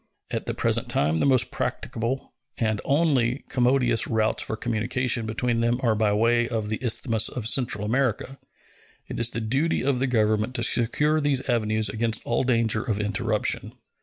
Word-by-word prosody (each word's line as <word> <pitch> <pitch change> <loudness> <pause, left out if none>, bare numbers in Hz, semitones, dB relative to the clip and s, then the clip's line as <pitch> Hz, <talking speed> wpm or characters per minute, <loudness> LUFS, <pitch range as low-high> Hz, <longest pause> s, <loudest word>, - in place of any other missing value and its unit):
At - - -3
the - - -2
present - - 0
time 80 +3 +1
the - - +2
most 130 -3 +3
practicable 120 +4 -3 0.2
and 110 -3 -1
only, 140 -5 +1
commodious 125 -2 +2
routes 110 -1 0
for 110 - -3
communication 120 +1 -1
between 115 +1 -1
them 120 +1 +1
are 115 -3 +3
by 110 0 +1
the 105 - +1
way 115 +2 +2
of 110 -3 -2
the 110 +3 -3
isthmus 115 -2 +1
of 115 -4 -4
Central 115 -5 0
America. 130 +2 -1 0.7
It - - -6
is 115 -1 +2
the 115 - -4
duty 135 +10 0
of 135 -2 +1
the 135 - +1
Government 110 0 +1
to - - -1
secure 150 +6 +2
these 140 -3 +1
avenues 110 -3 +1
against 110 +2 -2
all 120 - 0
danger 115 -4 +1
of 105 -3 -2
interruption. 105 +1 -1
115 Hz, 175 wpm, -25 LUFS, 110-125 Hz, 0.7 s, most